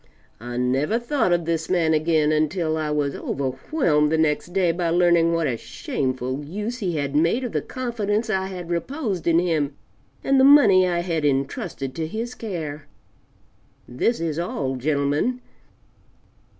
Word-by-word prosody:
I 120 Hz, +2 st, -6 dB
never 135 Hz, -, +1 dB
thought 240 Hz, -4 st, 0 dB
of 175 Hz, -1 st, +1 dB
this 165 Hz, -1 st, -2 dB
man 170 Hz, -3 st, +2 dB
again 155 Hz, -1 st, +2 dB
until 155 Hz, +1 st, 0 dB
I 155 Hz, -1 st, -2 dB
was 145 Hz, -2 st, 0 dB
overwhelmed 150 Hz, -, 0 dB
the 160 Hz, -, +2 dB
next 155 Hz, -1 st, +1 dB
day 180 Hz, -2 st, +2 dB
by 170 Hz, 0 st, -1 dB
learning 170 Hz, -1 st, +3 dB
what 165 Hz, -1 st, +1 dB
a 125 Hz, -5 st, -1 dB
shameful 130 Hz, +3 st, -3 dB
use 210 Hz, -, -5 dB
he 180 Hz, -6 st, -2 dB
had 140 Hz, -1 st, -2 dB
made 165 Hz, -, +2 dB
of 245 Hz, -, -3 dB
the -, -, -1 dB
confidence 230 Hz, -3 st, -2 dB
I 190 Hz, -3 st, -1 dB
had 180 Hz, -3 st, -7 dB
reposed 200 Hz, -, -3 dB
in 165 Hz, -1 st, +4 dB
him 155 Hz, -5 st, 0 dB, 0.5 s
and 270 Hz, 0 st, +3 dB
the -, -, +6 dB
money 220 Hz, -10 st, +7 dB
I 175 Hz, -1 st, 0 dB
had 165 Hz, -3 st, -2 dB
entrusted 135 Hz, -1 st, -2 dB
to 160 Hz, +1 st, -3 dB
his 230 Hz, +7 st, -4 dB
care. 155 Hz, -, -6 dB, 1.0 s
This 135 Hz, -, 0 dB
is 165 Hz, -1 st, -2 dB
all, 135 Hz, -6 st, -2 dB
gentlemen. 145 Hz, -, 0 dB
165 Hz, 160 wpm, -23 LUFS, 150-190 Hz, 1.0 s, money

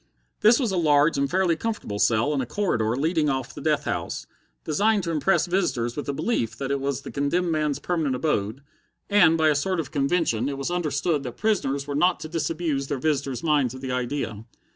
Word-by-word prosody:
This 225 Hz, +5 st, +5 dB
was 240 Hz, -7 st, 0 dB
a 190 Hz, -, -1 dB
large 150 Hz, -1 st, +4 dB
and 140 Hz, 0 st, 0 dB
fairly 180 Hz, -2 st, +2 dB
comfortable 185 Hz, -, -4 dB
cell 120 Hz, +8 st, +2 dB
in 140 Hz, -, 0 dB
a -, -, -2 dB
corridor 120 Hz, -, 0 dB
leading 155 Hz, +2 st, +1 dB
off 130 Hz, -2 st, -2 dB
the -, -, -9 dB
death -, -, +1 dB
house, -, -, -3 dB, 0.4 s
designed 205 Hz, +6 st, +1 dB
to 170 Hz, -, -2 dB
impress 165 Hz, +2 st, +2 dB
visitors 130 Hz, -10 st, -1 dB
with 145 Hz, -, -5 dB
the -, -, 0 dB
belief 135 Hz, -, -1 dB
that 135 Hz, 0 st, -3 dB
it 140 Hz, -, 0 dB
was 140 Hz, 0 st, -2 dB
the -, -, -8 dB
condemned 165 Hz, +5 st, 0 dB
man's 150 Hz, -3 st, 0 dB
permanent 160 Hz, -7 st, -1 dB
abode; 125 Hz, -3 st, -1 dB, 0.5 s
and, 175 Hz, -6 st, +5 dB
by 160 Hz, -1 st, +4 dB
a -, -, +4 dB
sort 185 Hz, +5 st, 0 dB
of 165 Hz, -, -4 dB
convention, 140 Hz, -4 st, +1 dB
it 140 Hz, -, -4 dB
was 140 Hz, +5 st, -3 dB
understood 160 Hz, -2 st, 0 dB
that 125 Hz, -3 st, -7 dB
prisoners 140 Hz, -11 st, 0 dB
were 145 Hz, -, -4 dB
not 175 Hz, +5 st, +2 dB
to -, -, -5 dB
disabuse 160 Hz, -3 st, -2 dB
their 140 Hz, -, -2 dB
visitors' 140 Hz, -3 st, -1 dB
minds 145 Hz, -6 st, +2 dB
of 130 Hz, -, -9 dB
the 130 Hz, -1 st, -4 dB
idea. 120 Hz, -4 st, -3 dB
145 Hz, 210 wpm, -25 LUFS, 135-170 Hz, 0.5 s, This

